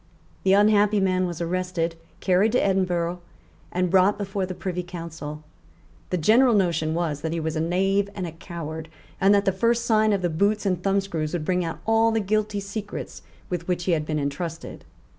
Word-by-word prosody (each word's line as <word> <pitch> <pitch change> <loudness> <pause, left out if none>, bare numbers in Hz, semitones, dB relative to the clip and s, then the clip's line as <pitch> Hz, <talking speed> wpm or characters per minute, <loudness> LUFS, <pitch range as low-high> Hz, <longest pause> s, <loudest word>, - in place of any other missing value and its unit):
The 190 - +3
unhappy 210 0 +4
man 185 -1 +1
was 175 -1 -5
arrested, 175 -1 -1 0.3
carried 195 +4 +3
to 250 - +3
Edinburgh, 180 -2 0 0.5
and 180 -1 0
brought 190 +2 +4
before 195 -2 -2
the 185 - -5
Privy 180 -1 -3
Council. 165 -4 -7 0.7
The 180 - 0
general 230 +8 +5
notion 165 -5 +1
was 160 -4 -1
that 160 0 -2
he 170 - -1
was 160 0 -2
a 155 - 0
knave 195 +4 +1
and 185 - -3
a 170 - -5
coward, 160 -1 -7 0.3
and 195 - +5
that 200 0 +2
the 195 - +3
first 230 +5 +1
sight 220 -1 +3
of 195 -2 0
the 175 - +2
boots 205 +6 +1
and 185 -3 0
thumbscrews 195 -5 -1
would 165 -3 -2
bring 180 +1 +1
out 165 -1 -5
all 225 +1 +4
the 225 - +1
guilty 210 0 0
secrets 200 +1 -6 0.3
with 175 -2 -4
which 180 -1 -1
he 180 - 0
had 155 -2 0
been 155 - -1
entrusted. 150 +3 -4
185 Hz, 195 wpm, -24 LUFS, 165-200 Hz, 0.7 s, general